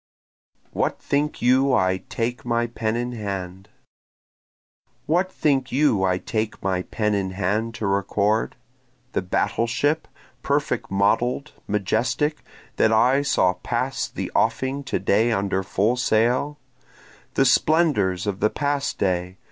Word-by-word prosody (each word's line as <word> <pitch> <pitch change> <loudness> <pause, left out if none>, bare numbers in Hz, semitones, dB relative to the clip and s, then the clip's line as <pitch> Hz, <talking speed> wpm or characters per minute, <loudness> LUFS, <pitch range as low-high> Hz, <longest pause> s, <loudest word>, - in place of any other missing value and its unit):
What - - -1
Think 145 -1 -1
You 130 +2 +4
I 95 -3 +2
Take 120 +1 -2
My 120 -1 0
Pen 115 -1 -2
in 120 +1 -2
Hand? 100 -3 -5 1.4
What 180 +4 +1
think 135 -6 0
you 130 -8 +2
I 90 -1 +2
take 110 +3 -3
my 95 -1 0
pen 105 +3 -1
in 100 -2 0
hand 105 +4 -1
to 110 - -4
record? 100 +2 0 0.6
The - - 0
battle 95 +5 0
ship, 145 +7 0 0.3
perfect - - -1
model'd, 120 +8 +1 0.2
majestic, 115 +9 0 0.4
that 110 - +4
I 125 +5 +4
saw 90 -10 +2
pass 90 - -2
the - - -5
offing 130 +5 0
to - - -1
day 110 +4 +2
under 95 -2 0
full 100 +5 +1
sail? 125 +5 +1 0.8
The - - +4
splendors 120 - +2
of 100 -2 -2
the 105 - +3
past 145 +1 -1
day? 90 0 -1
110 Hz, 130 wpm, -23 LUFS, 100-130 Hz, 1.4 s, You